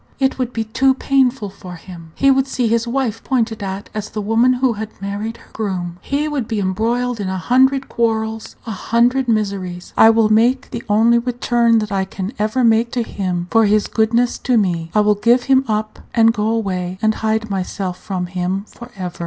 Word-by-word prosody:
It 265 Hz, -1 st, 0 dB
would 250 Hz, -1 st, -1 dB
be 225 Hz, -2 st, -2 dB
too 260 Hz, +5 st, +2 dB
painful 260 Hz, -6 st, +1 dB
for 185 Hz, -2 st, -10 dB
him. 165 Hz, -1 st, -12 dB
He 275 Hz, 0 st, +4 dB
would 270 Hz, 0 st, +2 dB
see 250 Hz, -3 st, -1 dB
his 230 Hz, +1 st, +1 dB
wife 235 Hz, -3 st, -2 dB
pointed 230 Hz, -4 st, -1 dB
at 195 Hz, 0 st, -5 dB
as 215 Hz, -1 st, -4 dB
the 215 Hz, -, -5 dB
woman 225 Hz, +4 st, +3 dB
who 250 Hz, -1 st, +1 dB
had 215 Hz, 0 st, -5 dB
married 205 Hz, +3 st, -4 dB
her -, -, -20 dB
groom. 180 Hz, -5 st, -4 dB
He 290 Hz, +2 st, -1 dB
would 285 Hz, -7 st, -2 dB
be 220 Hz, -, -2 dB
embroiled 225 Hz, +5 st, -1 dB
in 195 Hz, -2 st, -2 dB
a 190 Hz, -, -2 dB
hundred 260 Hz, +8 st, +2 dB
quarrels, 220 Hz, -1 st, -2 dB
a 225 Hz, -, -5 dB
hundred 240 Hz, +5 st, +1 dB
miseries. 195 Hz, -5 st, -2 dB
I 220 Hz, -, +7 dB
will 225 Hz, -1 st, +3 dB
make 240 Hz, +5 st, +2 dB
the 235 Hz, -, -4 dB
only 230 Hz, +3 st, +4 dB
return 240 Hz, -1 st, +1 dB
that 215 Hz, -1 st, -2 dB
I 195 Hz, -1 st, 0 dB
can 195 Hz, +3 st, -6 dB
ever 215 Hz, +4 st, 0 dB
make 230 Hz, 0 st, +3 dB
to 245 Hz, -, 0 dB
him 180 Hz, -5 st, -3 dB
for 225 Hz, -1 st, +4 dB
his 210 Hz, 0 st, +2 dB
goodness 230 Hz, +2 st, +1 dB
to 250 Hz, -2 st, +1 dB
me 170 Hz, -5 st, 0 dB
I 210 Hz, -, +5 dB
will 210 Hz, 0 st, +4 dB
give 235 Hz, +4 st, +2 dB
him 265 Hz, 0 st, +3 dB
up, 215 Hz, 0 st, -2 dB, 0.2 s
and 225 Hz, -1 st, +5 dB
go 215 Hz, -1 st, -1 dB
away 185 Hz, -5 st, -2 dB
and 220 Hz, +1 st, +2 dB
hide 220 Hz, 0 st, -1 dB
myself 185 Hz, -1 st, -3 dB
from 185 Hz, -2 st, -4 dB
him 185 Hz, +2 st, -3 dB
for 240 Hz, +1 st, -12 dB
ever." 180 Hz, -2 st, -6 dB
220 Hz, 205 wpm, -18 LUFS, 195-240 Hz, 0.2 s, I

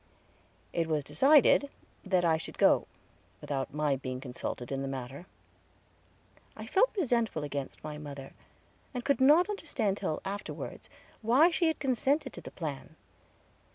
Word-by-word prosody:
It 165 Hz, -1 st, 0 dB
was 155 Hz, -2 st, 0 dB
decided 285 Hz, -, +5 dB, 0.3 s
that 185 Hz, -3 st, +1 dB
I 160 Hz, -1 st, +3 dB
should -, -, -8 dB
go, -, -, +4 dB, 0.5 s
without 135 Hz, -2 st, -3 dB
my 150 Hz, -1 st, +1 dB
being 130 Hz, -1 st, -5 dB
consulted 125 Hz, -1 st, -5 dB
in 135 Hz, 0 st, -2 dB
the 135 Hz, -, -3 dB
matter. 135 Hz, +5 st, -6 dB, 1.3 s
I -, -, -7 dB
felt 410 Hz, +6 st, +3 dB
resentful 235 Hz, -, +1 dB
against 140 Hz, -2 st, -5 dB
mother, 145 Hz, -3 st, -7 dB, 0.6 s
and 245 Hz, -, -4 dB
could 280 Hz, -2 st, +2 dB
not 300 Hz, +7 st, +6 dB
understand 290 Hz, -, -1 dB
till 170 Hz, -7 st, -2 dB
afterward, 200 Hz, +1 st, -6 dB, 0.3 s
why 260 Hz, +10 st, +5 dB
she 340 Hz, 0 st, +2 dB
had 320 Hz, -, +1 dB
consented 275 Hz, +3 st, 0 dB
to -, -, -8 dB
the -, -, -9 dB
plan. -, -, -6 dB
185 Hz, 140 wpm, -30 LUFS, -, 1.3 s, not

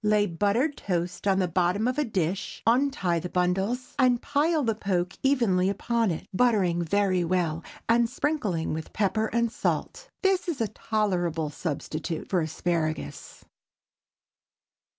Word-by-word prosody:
Lay 210 Hz, -1 st, +3 dB
buttered 205 Hz, -, 0 dB
toast 180 Hz, +1 st, -2 dB
in 195 Hz, -1 st, +3 dB
the 185 Hz, -1 st, +2 dB
bottom 180 Hz, +5 st, +1 dB
of 255 Hz, +3 st, 0 dB
a -, -, +3 dB
dish, 190 Hz, -, -2 dB
untie 230 Hz, -8 st, +2 dB
the 180 Hz, -, -5 dB
bundles, 190 Hz, +8 st, 0 dB
and 250 Hz, -2 st, +4 dB
pile 305 Hz, +3 st, +1 dB
the 225 Hz, -2 st, +1 dB
poke 190 Hz, -4 st, -1 dB
evenly 225 Hz, -9 st, +3 dB
upon 230 Hz, +2 st, 0 dB
it, 165 Hz, -, -4 dB
buttering 190 Hz, -6 st, +2 dB
very 185 Hz, +1 st, +1 dB
well, 170 Hz, -2 st, 0 dB, 0.2 s
and 230 Hz, 0 st, +3 dB
sprinkling 225 Hz, -, -1 dB
with 160 Hz, 0 st, -6 dB
pepper 215 Hz, +1 st, +1 dB
and 235 Hz, 0 st, 0 dB
salt. -, -, -2 dB
This 385 Hz, -1 st, +2 dB
is 335 Hz, -5 st, -2 dB
a 225 Hz, -3 st, 0 dB
tolerable 175 Hz, -9 st, -1 dB
substitute 160 Hz, +1 st, -4 dB
for 185 Hz, -3 st, +3 dB
asparagus. 160 Hz, 0 st, -3 dB
200 Hz, 140 wpm, -27 LUFS, 175-235 Hz, 0.2 s, and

